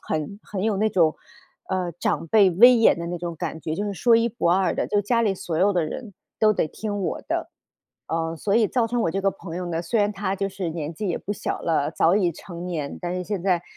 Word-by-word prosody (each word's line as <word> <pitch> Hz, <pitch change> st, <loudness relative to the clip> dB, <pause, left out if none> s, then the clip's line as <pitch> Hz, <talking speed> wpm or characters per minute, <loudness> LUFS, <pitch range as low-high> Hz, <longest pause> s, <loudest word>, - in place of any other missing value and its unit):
很 155 Hz, +6 st, -3 dB
很 195 Hz, -2 st, -5 dB
有 215 Hz, -1 st, +1 dB
那 215 Hz, +2 st, +1 dB
种 165 Hz, -5 st, +3 dB, 0.5 s
呃， 185 Hz, -2 st, -1 dB
长 170 Hz, 0 st, -2 dB
辈 195 Hz, +2 st, +5 dB
威 240 Hz, +9 st, +7 dB
严 225 Hz, -6 st, +4 dB
的 170 Hz, -, -4 dB
那 175 Hz, -, -3 dB
种 170 Hz, 0 st, -5 dB
感 160 Hz, -1 st, -4 dB
觉， 160 Hz, 0 st, -4 dB
就 205 Hz, -, -2 dB
是 200 Hz, -, -3 dB
说 230 Hz, +5 st, +4 dB
一 230 Hz, +1 st, +2 dB
不 215 Hz, -6 st, 0 dB
二 185 Hz, +1 st, +2 dB
的。 -, -, -1 dB
就 205 Hz, -, +1 dB
家 230 Hz, +3 st, +1 dB
里 205 Hz, -4 st, +1 dB
所 170 Hz, -3 st, -4 dB
有 195 Hz, +4 st, +3 dB
的 180 Hz, -3 st, +1 dB
人 210 Hz, +6 st, -7 dB, 0.3 s
都 215 Hz, -1 st, +5 dB
得 165 Hz, -, 0 dB
听 205 Hz, +4 st, -4 dB
我 185 Hz, -, -3 dB
的， -, -, -3 dB, 0.6 s
呃， 165 Hz, 0 st, -2 dB
所 200 Hz, +5 st, -1 dB
以 220 Hz, -2 st, +4 dB
造 240 Hz, -3 st, +1 dB
成 240 Hz, +1 st, -1 dB
我 170 Hz, -, +1 dB
这 195 Hz, +3 st, -2 dB
个 195 Hz, -, +3 dB
朋 175 Hz, -3 st, -8 dB
友 180 Hz, -, -3 dB
呢， 170 Hz, -2 st, -2 dB
虽 225 Hz, +7 st, -1 dB
然 205 Hz, 0 st, +2 dB
她 195 Hz, -1 st, -2 dB
就 195 Hz, +1 st, -1 dB
是 190 Hz, -2 st, -4 dB
年 160 Hz, -1 st, -4 dB
纪 205 Hz, +5 st, -4 dB
也 175 Hz, -, 0 dB
不 205 Hz, -, -4 dB
小 205 Hz, -, -3 dB
了， 155 Hz, -3 st, +1 dB
早 165 Hz, +2 st, +3 dB
已 185 Hz, -4 st, +2 dB
成 170 Hz, +1 st, -8 dB
年。 155 Hz, -5 st, -4 dB
但 175 Hz, 0 st, -3 dB
是 180 Hz, -, -2 dB
现 200 Hz, +1 st, -3 dB
在， 180 Hz, -3 st, +1 dB
185 Hz, 280 characters per minute, -24 LUFS, 170-205 Hz, 0.6 s, 威